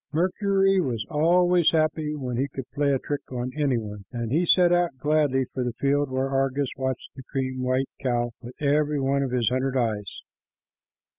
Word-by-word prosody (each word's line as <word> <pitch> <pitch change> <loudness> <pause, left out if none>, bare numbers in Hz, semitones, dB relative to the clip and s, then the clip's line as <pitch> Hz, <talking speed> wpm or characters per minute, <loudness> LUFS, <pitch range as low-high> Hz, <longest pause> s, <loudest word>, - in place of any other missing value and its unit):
Mercury 195 +3 +2
was 120 -8 -2
always 175 +2 +4
happy 155 -1 0
when 130 -4 -4
he 135 +4 0
could 135 -3 -7
play 145 0 +1
a 135 - +3
trick 145 +2 -4
on 125 0 -3
any 145 -5 +1
one, 105 -3 -7
and 120 -2 -4
he 170 +5 +2
set 175 0 +5
out 175 -6 +1
gladly 145 -2 +2
for 130 - -2
the 125 -1 -2
field 140 +3 +1
where 130 +1 -1
Argus 135 0 0
watched 130 -1 -3
the 135 - -9
cream 130 0 -3
white 130 +1 +1 0.2
cow 120 -2 0
with 125 +1 -11
every 150 0 +1
one 135 +1 +1
of 135 - -1
his 125 -3 +1
hundred 130 +1 0
eyes. 105 -5 -2
135 Hz, 190 wpm, -25 LUFS, 125-150 Hz, 0.2 s, set